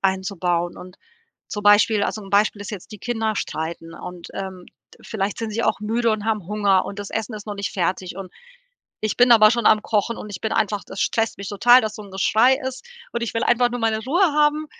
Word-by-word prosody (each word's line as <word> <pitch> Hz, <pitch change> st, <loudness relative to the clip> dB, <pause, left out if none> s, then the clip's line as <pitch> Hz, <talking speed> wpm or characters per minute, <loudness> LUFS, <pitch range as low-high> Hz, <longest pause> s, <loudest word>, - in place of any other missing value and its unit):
einzubauen 185 Hz, -3 st, -1 dB
und 180 Hz, 0 st, -12 dB, 0.5 s
zum 210 Hz, -1 st, -5 dB
Beispiel 205 Hz, +1 st, +5 dB
also 215 Hz, -, -3 dB
'n 195 Hz, -, -12 dB
Beispiel 205 Hz, 0 st, +2 dB
ist 205 Hz, -, -7 dB
jetzt: 205 Hz, +1 st, -9 dB
Die 210 Hz, -, -9 dB
Kinder 225 Hz, -2 st, -2 dB
streiten 165 Hz, -2 st, -5 dB
und, 180 Hz, -1 st, -9 dB
ähm, 190 Hz, -2 st, -6 dB, 0.4 s
vielleicht 200 Hz, -2 st, -3 dB
sind 225 Hz, -1 st, -3 dB
sie 230 Hz, +2 st, -2 dB
auch 220 Hz, -, 0 dB
müde 230 Hz, +2 st, 0 dB
und 215 Hz, -1 st, -2 dB
haben 215 Hz, -5 st, -1 dB
Hunger 200 Hz, -2 st, +2 dB
und 200 Hz, -, -7 dB
das 205 Hz, -, -7 dB
Essen 220 Hz, 0 st, -3 dB
ist 210 Hz, 0 st, -9 dB
noch 205 Hz, -, -4 dB
nicht 200 Hz, 0 st, -4 dB
fertig 185 Hz, 0 st, -2 dB
und 190 Hz, -2 st, -8 dB, 0.7 s
ich 215 Hz, -1 st, -2 dB
bin 245 Hz, 0 st, +5 dB
aber 215 Hz, -2 st, +7 dB
schon 235 Hz, -2 st, -1 dB
am 215 Hz, -1 st, +6 dB
Kochen 225 Hz, +1 st, 0 dB
und 210 Hz, -, -8 dB
ich 185 Hz, -, -7 dB
bin 220 Hz, -, -2 dB
einfach 210 Hz, -2 st, 0 dB
das 195 Hz, -, -8 dB
stresst 225 Hz, 0 st, 0 dB
mich 200 Hz, -1 st, -6 dB
total, 240 Hz, +5 st, +6 dB
dass 215 Hz, -1 st, -4 dB
so 215 Hz, -, -8 dB
'n 200 Hz, -, -13 dB
Geschrei 225 Hz, +7 st, +3 dB
ist 260 Hz, -, -6 dB, 0.3 s
und 235 Hz, -, -3 dB
ich 235 Hz, -, -3 dB
will 230 Hz, -, 0 dB
einfach 240 Hz, 0 st, +3 dB
nur 245 Hz, -1 st, -4 dB
meine 220 Hz, -1 st, +1 dB
Ruhe 340 Hz, +9 st, +1 dB
haben 300 Hz, +1 st, +2 dB
210 Hz, 230 wpm, -22 LUFS, 195-225 Hz, 0.7 s, aber